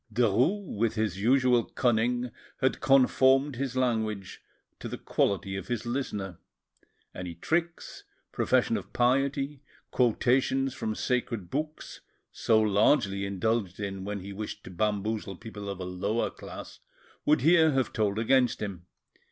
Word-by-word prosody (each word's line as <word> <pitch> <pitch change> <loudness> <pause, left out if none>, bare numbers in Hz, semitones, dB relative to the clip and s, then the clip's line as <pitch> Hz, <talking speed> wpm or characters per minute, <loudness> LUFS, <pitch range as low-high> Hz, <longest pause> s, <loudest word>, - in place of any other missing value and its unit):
Derues, 125 - +2
with 115 0 +1
his 105 -4 -1
usual 125 0 +4
cunning, 120 +1 0 0.3
had 130 - +1
conformed 135 0 +4
his 135 -1 -3
language 110 -6 -1 0.4
to - - -6
the - - -5
quality 95 -1 0
of 95 -1 -6
his 120 -2 -3
listener. 105 -8 -3 0.7
Any 90 -2 -6
tricks, 165 - -2 0.3
profession - - +2
of - - -9
piety, 135 +3 +1 0.3
quotations 130 +2 +2
from 110 -5 -3
sacred 115 -8 -2
books, 155 +2 -4 0.3
so 110 -1 +2
largely 100 -1 +2
indulged 100 -1 -1
in 95 -2 -4
when 100 0 -4
he 100 +2 -8
wished 105 +2 -6
to - - -10
bamboozle 105 +1 -1
people 105 0 -8
of 100 -1 -5
a 90 - -4
lower 100 +5 -1
class, - - -10 0.4
would 300 +1 +3
here 160 -2 +5
have 130 -3 0
told 105 -2 0
against 125 +2 +2
him. 95 -4 -6
115 Hz, 135 wpm, -28 LUFS, 100-130 Hz, 0.7 s, here